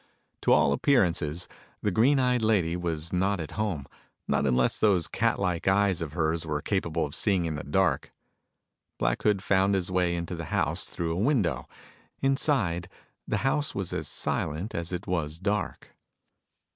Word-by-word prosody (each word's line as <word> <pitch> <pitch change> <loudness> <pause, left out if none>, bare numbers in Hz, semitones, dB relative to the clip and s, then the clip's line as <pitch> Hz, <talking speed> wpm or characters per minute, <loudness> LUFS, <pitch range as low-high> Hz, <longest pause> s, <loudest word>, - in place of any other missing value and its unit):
To - - +2
all 70 - +5
appearances, 85 - +1 0.4
the 105 - +1
green 130 +9 +4
eyed 125 -2 +2
lady 100 -7 +2
was 85 -2 -3
not 95 +2 +1
at 80 - -5
home 100 -10 -2 0.4
not 70 - +1
unless 60 -1 +2
those 95 -6 +3
catlike 100 -7 0
eyes 95 -2 +3
of 75 -3 -4
hers 80 -1 0
were 75 -2 -2
capable 85 -2 -1
of 70 - -8
seeing 95 -5 +1
in 80 - -2
the 75 - -5
dark. 70 - +1 0.9
Black - - 0
Hood 105 -2 +2
found 95 0 +3
his 90 -1 -1
way 90 -1 +1
into 85 +1 -4
the 85 -1 -5
house - - -1
through 85 -1 -3
a 90 - -1
window. 100 - +1 0.5
Inside, 130 - +1 0.4
the - - 0
house 145 +2 +1
was 95 -3 -3
as - - -3
silent 85 +9 -2
as 85 +1 -3
it 90 +2 -4
was 80 -5 -2
dark. 100 +2 -3
90 Hz, 165 wpm, -27 LUFS, 80-105 Hz, 0.9 s, all